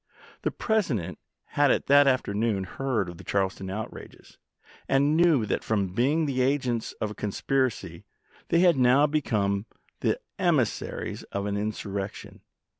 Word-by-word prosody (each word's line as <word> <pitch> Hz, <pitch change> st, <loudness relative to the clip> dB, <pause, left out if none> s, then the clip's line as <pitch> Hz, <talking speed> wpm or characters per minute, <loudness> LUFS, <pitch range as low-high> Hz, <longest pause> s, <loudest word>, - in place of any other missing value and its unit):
The -, -, 0 dB
President 135 Hz, -, -1 dB, 0.3 s
had 145 Hz, -1 st, +3 dB, 0.2 s
that 140 Hz, -2 st, +5 dB
forenoon 105 Hz, -1 st, 0 dB
heard 120 Hz, 0 st, -2 dB
of 85 Hz, -1 st, -9 dB
the -, -, -10 dB
Charleston 95 Hz, -1 st, -1 dB
outrages, 105 Hz, +3 st, -8 dB, 0.5 s
and 140 Hz, +3 st, +3 dB
knew 160 Hz, -8 st, +4 dB
that 100 Hz, -, -2 dB
from 100 Hz, -4 st, -1 dB
being 145 Hz, -, +2 dB
the 130 Hz, -3 st, -1 dB
agents 130 Hz, -3 st, 0 dB
of 105 Hz, -, -4 dB
a -, -, -6 dB
conspiracy 105 Hz, -5 st, -2 dB, 0.5 s
they 170 Hz, -, +3 dB
had 175 Hz, -5 st, +5 dB
now 130 Hz, +3 st, +5 dB
become 110 Hz, -9 st, 0 dB, 0.3 s
the -, -, 0 dB, 0.2 s
emissaries 160 Hz, -, 0 dB
of 100 Hz, 0 st, -2 dB
an 100 Hz, 0 st, -2 dB
insurrection. 100 Hz, -1 st, -5 dB
120 Hz, 135 wpm, -27 LUFS, 100-140 Hz, 0.5 s, that